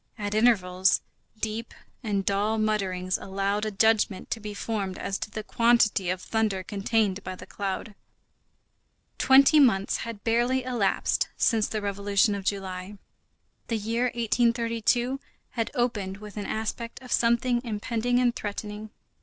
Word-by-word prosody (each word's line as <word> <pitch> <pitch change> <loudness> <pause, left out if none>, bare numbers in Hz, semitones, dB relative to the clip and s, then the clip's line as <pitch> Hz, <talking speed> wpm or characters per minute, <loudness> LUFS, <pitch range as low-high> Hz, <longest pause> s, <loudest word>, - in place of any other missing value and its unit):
At 205 -1 -3
intervals, 190 -5 +3 0.4
deep 220 +1 -4 0.3
and 200 -5 -1
dull 205 +3 +1
mutterings 190 -4 0
allowed 200 +2 -1
a - - 0
judgment 210 -2 +1
to 225 - -1
be 210 -1 -7
formed 200 -3 -3
as 195 -1 -3
to - - -4
the 215 0 -6
quantity 225 -5 +3
of 185 0 -1
thunder 215 -4 0
contained 205 0 0
by 185 0 -5
the 185 - -11
cloud. 200 +2 -4 1.3
Twenty 275 +3 +6
months 205 -8 +3
had 230 -3 -7
barely 240 +3 +2
elapsed 240 -6 0
since 220 -3 +2
the 215 -2 -3
Revolution 200 +1 +1
of 200 -1 -5
July, 195 0 -3 0.7
the 230 - 0
year 230 +3 -1
1832 235 +1 +1 0.3
had 230 -2 -2
opened 210 -6 -1
with 210 0 -11
an 205 -2 -4
aspect 225 +1 -4
of 250 - -11
something 240 +1 +2
impending 230 +2 -1
and 245 -1 +2
threatening. 210 0 -5
215 Hz, 140 wpm, -27 LUFS, 200-230 Hz, 1.3 s, Twenty